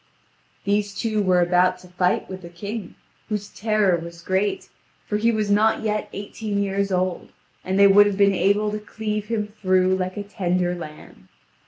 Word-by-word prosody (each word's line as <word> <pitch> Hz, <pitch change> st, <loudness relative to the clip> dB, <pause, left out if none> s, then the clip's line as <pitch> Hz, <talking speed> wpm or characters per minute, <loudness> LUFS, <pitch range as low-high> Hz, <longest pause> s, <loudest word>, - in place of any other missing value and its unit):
These 205 Hz, 0 st, 0 dB
two 215 Hz, 0 st, 0 dB
were 185 Hz, -2 st, +3 dB
about 180 Hz, +1 st, +3 dB
to 180 Hz, -, -16 dB
fight 180 Hz, 0 st, 0 dB
with 185 Hz, 0 st, -8 dB
the 170 Hz, -, -10 dB
king, 200 Hz, +3 st, -7 dB, 0.3 s
whose 210 Hz, -2 st, -3 dB
terror 215 Hz, -4 st, +1 dB
was 170 Hz, 0 st, -10 dB
great, 190 Hz, +3 st, -1 dB, 0.4 s
for 210 Hz, -, -1 dB
he 230 Hz, +2 st, +2 dB
was 215 Hz, -2 st, -1 dB
not 215 Hz, +2 st, +3 dB
yet 215 Hz, -1 st, -1 dB
eighteen 205 Hz, 0 st, -3 dB
years 200 Hz, 0 st, -1 dB
old, 185 Hz, -1 st, -1 dB, 0.3 s
and 190 Hz, +1 st, -1 dB
they 200 Hz, -, +7 dB
would 205 Hz, +1 st, +7 dB
have 200 Hz, -2 st, -2 dB
been 200 Hz, -1 st, +4 dB
able 200 Hz, +3 st, +2 dB
to 210 Hz, -, -3 dB
cleave 210 Hz, 0 st, -4 dB
him 210 Hz, -2 st, -2 dB
through 185 Hz, -1 st, +3 dB
like 185 Hz, 0 st, -3 dB
a 205 Hz, -, -3 dB
tender 180 Hz, -3 st, -1 dB
lamb. 155 Hz, -, -10 dB
200 Hz, 180 wpm, -23 LUFS, 185-210 Hz, 0.4 s, they